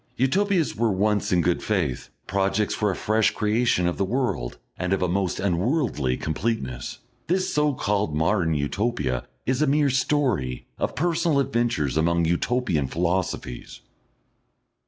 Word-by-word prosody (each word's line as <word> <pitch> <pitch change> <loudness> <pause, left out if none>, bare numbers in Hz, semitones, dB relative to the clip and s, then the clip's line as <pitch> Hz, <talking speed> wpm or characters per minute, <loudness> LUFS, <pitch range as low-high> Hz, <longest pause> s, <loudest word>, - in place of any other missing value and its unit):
Utopias 175 - +2
were 115 0 +1
once 105 +2 +1
in 90 -1 +4
good 90 0 +1
faith, 65 - -1 0.2
projects 100 +1 0
for 105 - 0
a 95 - -1
fresh 110 0 +2
creation 105 -3 +2
of 90 - -1
the - - +1
world 100 - -1 0.2
and 90 +1 -1
of 95 - +1
a - - +2
most 95 0 -1
unworldly 95 - 0
completeness; 80 - -3 0.3
this 185 +2 0
so 150 -2 +2
called 100 -9 0
Modern 80 +1 +1
Utopia 75 - -1 0.2
is 130 +2 0
a 155 - +3
mere 145 0 +3
story 125 - 0
of - - -1
personal 165 -2 +1
adventures 120 - 0
among 85 +1 +2
Utopian 85 - 0
philosophies. 85 -6 -2
100 Hz, 140 wpm, -24 LUFS, 85-125 Hz, 0.3 s, in